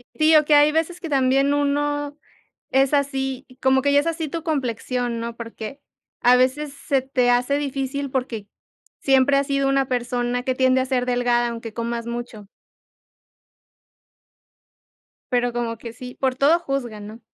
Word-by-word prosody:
Sí, 315 0 +4
o 305 -1 +6
que 295 0 +4
hay 295 +1 +6
veces 325 +3 -1
que 330 - -6
también 275 +1 +2
uno 290 0 -1 0.5
es 270 +2 +3
así 270 -2 -1 0.2
como 265 0 +3
que 285 - +2
ya 285 - +6
es 290 - -1
así 330 -1 -2
tu 330 +2 -5
complexión, 250 -5 -2
¿no? 230 0 -5
Porque 230 +4 -8 0.4
a 245 +1 +6
veces 270 +3 +1
se 275 -1 -1
te 255 -2 +1
hace 245 +3 +2
difícil, 275 -1 -3
porque 250 -6 -3 0.5
siempre 270 +1 +3
has 275 - 0
sido 275 -1 +1
una 275 -1 +2
persona 245 0 -1
que 260 -1 -1
tiende 260 0 +3
a - - -1
ser 255 -2 0
delgada, 245 -1 +1
aunque 230 -1 -7
comas 235 0 -4
mucho. 235 -3 -6 2.8
Pero 245 0 +1
como 235 -1 -3
que 230 0 -9
sí, 250 +1 -9
por 260 -1 0
todo 295 +6 +4
juzgan, 245 -9 -4
¿no? 220 +2 -10
265 Hz, 165 wpm, -22 LUFS, 245-285 Hz, 2.8 s, o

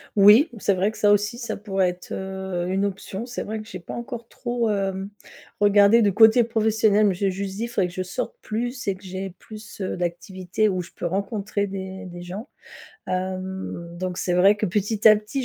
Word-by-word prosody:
Oui, 210 - +7
c'est 200 -1 +1
vrai 190 +3 +1
que - - -13
ça 205 -1 +4
aussi, 210 +3 +2
ça 235 - -4
pourrait 195 -3 0
être, 180 0 -9
heu, 190 -2 -4
une 190 +2 0
option. 195 +2 -5
C'est 245 - -5
vrai 220 +1 -4
que 215 - -13
j'ai 185 - -7
pas - - -9
encore 235 -1 -6
trop, 240 -2 -2
hem, 195 -1 -1 0.5
regardé 205 +2 +6
du 205 -3 +3
côté 220 +3 +7
professionnel, 220 -2 +2
mais 200 - +3
j'ai 195 +2 0
juste 195 +1 -4
dit: 230 +2 -2
«Faudrait 200 -6 0
que 175 - -13
je 185 - -3
sorte 180 - -4
plus 240 +2 -4
et 195 - +1
que 190 - -18
j'ai 190 +1 -5
plus, 215 -2 -11
heu, 185 - -2
d'activités 180 +3 -1
où 185 -2 0
je 175 - -11
peux - - -5
rencontrer 200 +2 -2
des 190 0 -6
des 175 -1 -9
gens». 200 +9 -7 0.6
Hem, 185 -2 -4
donc 180 -1 -3
c'est 180 - 0
vrai 195 +3 +6
que 210 - -1
petit 210 +3 +3
à 215 - +8
petit, 215 +6 -4
200 Hz, 210 wpm, -24 LUFS, 185-215 Hz, 0.6 s, à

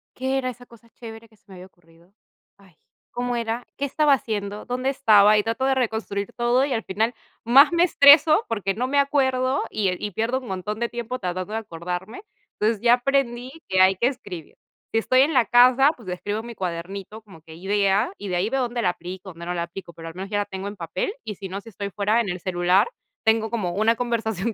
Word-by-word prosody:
"¿Qué 265 +1 -1
era 255 -1 -2
esa 245 0 -10
cosa 230 -1 -19
chévere, 225 -1 -11
que 220 - -25
se - - -38
me 195 - -14
había 180 +1 -11
ocurrido? 170 +1 -26 0.4
Ay, 190 -5 -22 0.4
¿cómo 245 0 -2
era? 230 +1 -3
¿Qué 280 - -1
estaba 295 +1 +3
haciendo? 210 -5 -3
¿Dónde 255 +2 -2
estaba?". 215 -6 +5
Y 210 - +2
trato 230 +4 -2
de 270 0 +2
reconstruir 220 -5 -2
todo, 245 +3 +2
y 275 - -2
al 225 - -2
final 220 +5 -1 0.3
más 275 +7 +7
me 340 +1 +4
estreso, 310 +4 +6
porque, 195 -4 -1
no 245 +5 -2
me 285 +2 0
acuerdo, 265 -1 +1
y, 200 -3 0
eh, 180 - -2
y 210 - -4
pierdo 230 +6 -1
un 250 - -12
montón 200 +3 -4
de 235 - -1
tiempo, 240 +1 -5
tratando 185 +3 -4
de 225 - -1
acordarme. 180 - -6 0.4
Entonces, 215 -1 +1
ya 240 0 +6
aprendí 250 -1 -1 0.2
que 190 0 +3
hay 190 +1 +5
que 240 - +2
escribir. 180 - -7 0.4
Si - - +2
estoy 255 +3 +3
en 300 +4 +3
la 255 -3 +4
casa, 255 +4 +5
pues, 220 -7 -11
escribo 205 +5 -4
mi 235 0 -8
cuadernito 190 +4 -6
como 190 -7 -16
que 160 -1 -13
idea, 200 - +1
y 205 - -7
de 180 - -2
ahí 190 +5 0
veo 270 +1 -1
dónde 240 0 -3
la 180 - +2
aplico, 180 +2 -7
dónde 170 +1 -10
no 175 - -3
la 170 -1 -2
aplico, 170 0 -9
pero, 165 0 -9
al 165 - -13
menos 190 +2 -6
ya 205 -1 -1
la 205 - -1
tengo 190 +1 -6
en 205 - -6
papel, 180 - -3
y 210 - -6
si 195 - -7
no, 195 +2 -5
si 225 - -13
estoy 200 -1 -6
fuera 210 +4 +1
en 215 - -4
el 180 0 -4
celular, 180 - +2 0.4
tengo 220 0 +2
como 200 -7 -2
una 220 +4 +2
conversación 225 -3 -2
220 Hz, 230 wpm, -23 LUFS, 190-245 Hz, 0.4 s, más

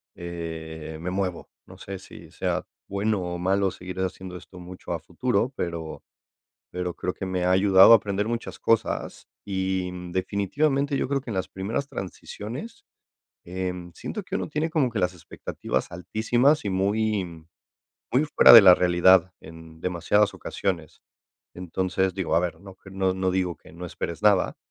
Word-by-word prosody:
eh, 80 -2 -6
me 90 +2 -4
muevo, 95 -2 -3 0.2
no - - -14
sé 95 0 -7
si 95 - -13
sea - - -2 0.2
bueno 100 0 0
o 90 0 -4
malo 95 +2 +1
seguir 90 +1 -8
haciendo 95 -1 -4
esto 90 +1 -11
mucho 90 0 -9
a 85 - -1
futuro, 120 - -1
pero 85 -2 -5 0.7
pero 90 -1 -3
creo 90 - -2
que 95 - -6
me 90 -1 -1
ha 90 - +2
ayudado 95 +2 +7
a - - +11
aprender 105 -1 -2
muchas 115 0 -4
cosas 115 - -1 0.2
y, 95 -2 -1
mm, 90 -1 -8
definitivamente 135 - 0
yo - - 0
creo 140 +1 0
que 130 - -15
en - - -3
las 95 -1 -2
primeras 105 +8 -3
transiciones, 130 - -7 0.6
em, 90 -1 -4
siento 210 - -6
que - - -5
uno - - -2
tiene 155 +2 -1
como 155 -6 +1
que 110 - -2
las 90 -1 +1
expectativas 80 -5 -4
altísimas 110 - +1
y - - 0
muy 95 -4 -1 0.7
muy 130 +4 +3
fuera 150 - +7
de 115 -2 +12
la 95 -2 +9
realidad 90 +1 +4
en 80 0 -13
demasiadas 90 +4 +1
ocasiones, 85 -6 -4 0.5
entonces, 95 +1 -1
digo, 95 -4 -1
a - - +5
ver, 85 -2 -3
no 95 0 -12
que 95 - -15
no 95 -1 0
no 95 0 0
digo 90 -2 0
que - - -17
no 90 +2 -7
esperes 85 +2 -5
nada, 100 -3 +3
95 Hz, 170 wpm, -25 LUFS, 90-105 Hz, 0.7 s, de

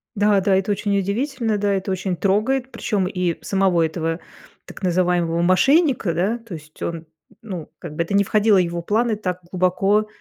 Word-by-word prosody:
Да 205 -1 +3
да, 195 0 +2
это 195 +2 0
очень 200 0 0
удивительно, 225 +3 -1
да, 205 0 +1
это 195 0 -2
очень 185 -1 -2
трогает, 235 +8 0
причем 200 -8 -1
и 180 -3 -1
самого 190 -4 +2
этого, 165 +1 -2 0.5
так - - -12
называемого 175 -2 +1
мошенника, 230 - +3
да. 200 +8 0
То 225 -6 -9
есть 155 0 -14
он, 165 -1 -4 0.4
ну, 185 -8 -7
как 150 - -8
бы 170 - 0
это 170 - -5
не 200 0 +4
входило 210 +1 +3
в - - +5
его 170 -1 -1
планы 220 +5 +1
так 185 -4 -3
глубоко, 195 +3 +2
195 Hz, 180 wpm, -21 LUFS, 175-210 Hz, 0.5 s, в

